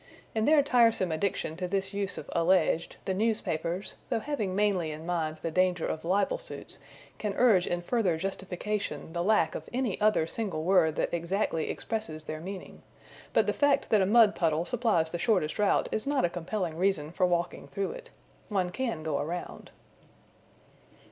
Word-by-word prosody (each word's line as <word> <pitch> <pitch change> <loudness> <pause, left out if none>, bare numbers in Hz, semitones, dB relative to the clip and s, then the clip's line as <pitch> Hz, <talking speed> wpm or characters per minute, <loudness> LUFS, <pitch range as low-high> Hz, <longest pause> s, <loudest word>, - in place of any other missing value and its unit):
In 220 0 +1
their 300 -1 +5
tiresome 230 - +3
addiction 160 -1 -1
to 180 0 -2
this 195 +1 -2
use 200 -1 -2
of - - -7
alleged, 170 -1 +2
the 190 - 0
newspapers, 185 -4 -1 0.2
though - - +1
having 220 -6 -2
mainly 195 -5 +1
in 155 +1 -7
mind 160 -3 -1
the 165 - -1
danger 180 0 +2
of 155 - -3
libel 200 - +1
suits, - - -9 0.4
can 205 -2 -2
urge 210 -8 +4
in 175 0 -2
further 190 -5 +1
justification 195 0 -4
the 170 - -1
lack 210 +4 +3
of - - -7
any 240 -5 -1
other 210 -6 +3
single 190 -3 -3
word 165 -3 +3
that - - -1
exactly 170 -1 -1
expresses 215 -9 -4
their 155 0 -5
meaning; 190 +2 -8 0.5
but - - +3
the - - +1
fact 285 -1 +2
that 215 -2 +5
a 190 - +2
mud 220 -1 +6
puddle 165 -1 +1
supplies 215 -9 +1
the 175 - -3
shortest 185 -4 +1
route 205 - +3
is 220 - -1
not 285 -9 +2
a - - +1
compelling 175 -1 -3
reason 175 -5 +1
for 180 +1 +2
walking 175 -1 -1
through 200 -1 -3
it. - - -10 0.4
One 185 -4 0
can 230 -9 -3
go 155 -3 -1
around. 175 +4 -5
185 Hz, 175 wpm, -29 LUFS, 165-215 Hz, 0.5 s, mud